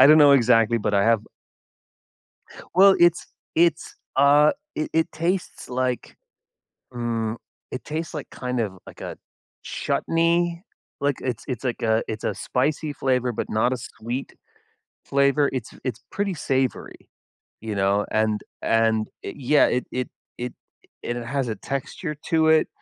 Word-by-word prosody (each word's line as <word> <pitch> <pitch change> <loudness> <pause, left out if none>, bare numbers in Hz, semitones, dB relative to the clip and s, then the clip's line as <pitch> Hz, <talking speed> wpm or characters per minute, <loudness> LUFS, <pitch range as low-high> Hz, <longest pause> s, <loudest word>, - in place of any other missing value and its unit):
I - - +10
don’t 155 +1 +8
know 140 - +8
exactly, 115 -1 +4
but 105 - +2
I - - +2
have 115 -2 +2 1.5
Well, 195 +1 +8
it’s 175 0 +4 0.3
it’s, 165 -1 +2 0.2
ah, 145 +2 +6 0.2
it 155 - -2
it 160 0 +1
tastes 175 +3 -2
like, 125 0 -2 0.8
mm, 115 -2 -2 0.4
it 130 - -5
tastes 160 +2 -4
like, 150 - -6
kind 125 -1 -3
of, 95 -4 -4
like - - -12
a - - -6 0.5
chutney, 170 +1 0 0.4
like, 140 -2 +1
it’s 125 -4 -3
it’s 130 -3 -4
like 120 - -2
a 110 0 +2
it’s 110 0 -5
a - - 0
spicy 145 +3 -1
flavor, 125 -2 +1
but - - -3
not 115 +4 +2
a 130 - -2
sweet 120 +2 -5 0.8
flavor. 140 +1 +3
It’s 125 -4 -4
it’s 125 -2 -3
pretty 200 -2 -1
savory, 130 -3 -2 0.5
you 110 -1 -4
know, 100 +1 +2
and 110 -1 +1 0.2
and, 110 -1 +2
it - - -6
yeah, 145 +2 +4
it 125 - 0
it 125 0 -2 0.3
it 125 0 -4 0.5
it 120 - -3
has 135 +1 -1
a 110 - -3
texture 140 - -4 0.2
to 160 -1 +4
it 160 0 +5
130 Hz, 150 wpm, -24 LUFS, 115-155 Hz, 1.5 s, I